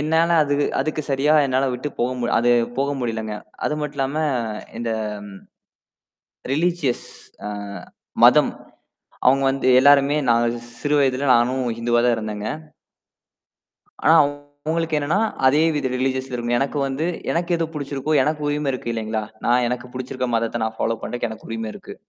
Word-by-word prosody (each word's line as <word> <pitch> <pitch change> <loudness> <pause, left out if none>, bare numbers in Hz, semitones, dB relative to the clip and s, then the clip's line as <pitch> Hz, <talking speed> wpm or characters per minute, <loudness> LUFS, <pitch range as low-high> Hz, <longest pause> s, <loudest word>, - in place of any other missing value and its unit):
என்னால 160 +3 +2
அது 145 -1 0 0.3
அதுக்கு 155 +2 -2
சரியா 140 +3 +2
என்னால 130 +1 +1
விட்டுப் 130 +4 -5
போக 125 0 -1
அது 120 +1 +3 0.3
போக 140 +1 0
முடியலைங்க. 110 -3 -3 0.3
அது 150 - 0
மட்டுமில்லாம 140 -1 -2 0.6
இந்த 115 -1 -2 0.2
ஆ - - -3 1.4
ரிலிஜியஸ் 160 -4 0 0.4
அ - - -3 0.7
மதம். - - +6 0.8
அவங்க 135 +2 +4
வந்து 135 -1 -2
எல்லாருமே 140 +1 +5
நாங்க 120 0 +3 0.3
சிறு 145 0 0
வயதில 135 0 +1
நானும் 125 +2 +2 0.2
இந்துவாதான் 120 +1 +3
இருந்தேங்க. 105 -1 -4 1.6
ஆனா 160 - +6
அவங்களுக்கு 145 +3 -2
என்னன்னா 155 +8 0 0.3
அதே 145 +4 +5
வித 145 -2 -1
ரிலிஜியஸ் 130 0 -1
இருந்து 120 0 0
எனக்கு 140 +2 -1
வந்து, 135 +5 -2 0.3
எனக்கு 170 +1 -1
எது 165 - 0
பிடிச்சிருக்கோ! 140 0 -3
எனக்கு 150 +2 -1
உரிமை 145 -1 0
இருக்கு 125 -2 -4
இல்லீங்களா? 110 -1 -2 0.2
நான் 125 +1 +3
எனக்குப் 125 0 -5
பிடிச்சிருக்கிற 130 0 -3
மதத்தை 115 0 -1
நான் 110 0 -4
ஃபோலா 115 0 0
பண்ணறதுக்கு 120 -1 -3
எனக்கு 110 - -10
உரிமை 115 -1 -3
இருக்கு. - - -10
135 Hz, 140 wpm, -22 LUFS, 120-145 Hz, 1.6 s, மதம்